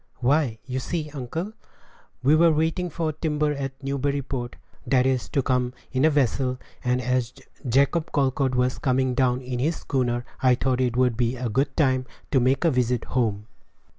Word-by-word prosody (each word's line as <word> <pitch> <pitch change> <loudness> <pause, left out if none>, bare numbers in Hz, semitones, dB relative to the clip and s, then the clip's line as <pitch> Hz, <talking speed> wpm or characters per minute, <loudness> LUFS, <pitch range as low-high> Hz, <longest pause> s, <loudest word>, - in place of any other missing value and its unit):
"Why, 130 -2 +1
you 130 0 -3
see, 155 +2 -3
uncle, 155 - -5 0.7
we 145 +4 +5
were 165 +1 +5
waiting 160 +3 0
for 160 -1 -2
timber 150 -1 0
at 135 -1 -5
Newburyport, 135 -2 -2 0.3
that 130 -2 +3
is 130 -2 0
to 140 - 0
come 125 -1 0 0.2
in 130 +3 +2
a - - +6
vessel; 130 -3 +1 0.3
and 125 0 +1
as 125 -1 -1 0.3
Jacob 140 +6 +2
Colcord 135 -2 +1
was 125 0 +1
coming 130 -1 +1
down 125 0 +1
in 125 -1 -4
his 155 +6 +1
schooner, 120 -4 -1 0.2
I 130 -1 +5
thought 130 0 0
it 125 -1 0
would 125 -2 +3
be 120 +1 0
a 125 -1 -3
good 135 +5 0
time 130 -4 +2 0.2
to 135 - +4
make 130 +6 +2
a 165 - +4
visit 125 -2 +1
home." 110 -5 -1
130 Hz, 175 wpm, -25 LUFS, 125-145 Hz, 0.7 s, a